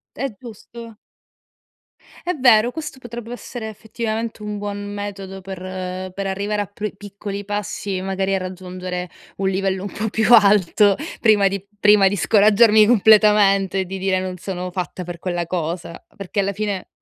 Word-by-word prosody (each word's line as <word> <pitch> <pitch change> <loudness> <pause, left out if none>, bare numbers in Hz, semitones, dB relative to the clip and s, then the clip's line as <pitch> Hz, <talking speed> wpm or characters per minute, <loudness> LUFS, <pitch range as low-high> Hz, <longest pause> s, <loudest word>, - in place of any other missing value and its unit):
È 265 -3 -3
giusto. 230 -1 -11 1.3
È 360 - 0
vero, 240 -4 +5
questo 300 -2 -7
potrebbe 240 -1 -8
essere 245 -2 -7
effettivamente 220 +1 -4
un 210 -1 -4
buon 205 0 -5
metodo 195 -2 -6
per 190 0 -7 0.6
per 195 +1 -4
arrivare 205 +2 -1
a - - -6
pr 205 +1 -6
piccoli 200 0 -7
passi, 205 -1 -3
magari, 195 0 -1
a - - +2
raggiungere 185 -1 -6 0.3
un 195 0 0
livello 190 0 -1
un 200 - -6
po' 220 +1 -2
più 220 +1 0
alto 205 -2 +5 0.2
prima 210 -4 +5
di 195 0 -5
prima 205 -2 +6
di 205 - -2
scoraggiarmi 215 +2 +5
completamente 210 -3 +5
e - - -1
di 190 +1 -5
dire: 185 -1 0
“Non 185 -1 -4
sono 180 0 -5
fatta 180 0 -5
per 175 0 -7
quella 175 -1 -3
cosa”; 170 0 -4
perché 200 +1 -3
alla 200 0 0
fine 200 -2 -3
200 Hz, 160 wpm, -21 LUFS, 190-215 Hz, 1.3 s, prima